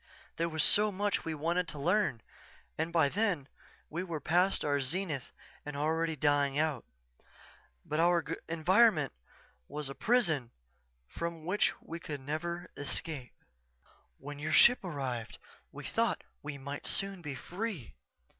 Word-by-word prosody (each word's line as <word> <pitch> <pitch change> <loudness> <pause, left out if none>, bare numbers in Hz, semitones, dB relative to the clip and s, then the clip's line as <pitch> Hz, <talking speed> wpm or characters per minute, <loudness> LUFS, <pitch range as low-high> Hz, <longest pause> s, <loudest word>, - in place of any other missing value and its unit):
There 170 +1 +1
was 160 -1 +1
so 210 0 +4
much 205 +1 0
we 160 -1 -2
wanted 170 +4 0
to - - -5
learn 175 - +2 0.5
and 160 +2 -1
by 165 -4 +4
then 180 -5 0 0.4
we 170 +3 -3
were 170 -4 -3
past 180 +6 +2
our 145 -1 +2
zenith 150 -1 -2 0.3
and 145 -1 -6
already 160 +2 +1
dying 145 -1 +2
out. 150 -5 +1 1.0
But 150 - -1
our 170 0 +4 0.3
environment 170 - +4 0.5
was 150 -2 -4
a - - -4
prison 165 - +2 0.6
from 170 - -5
which 195 +4 +2
we 165 +1 -7
could 145 -4 -5
never 170 +5 -3
escape._ 145 -2 -4 0.9
"_When 145 +1 -7
your 155 +1 -1
ship 245 +6 +7
arrived 135 - -4 0.3
we - - -8
thought - - 0 0.2
we 145 -1 -5
might 140 +1 -6
soon 195 -2 -1
be 150 -4 -5
free. 180 - -4
160 Hz, 140 wpm, -32 LUFS, 145-180 Hz, 1.0 s, ship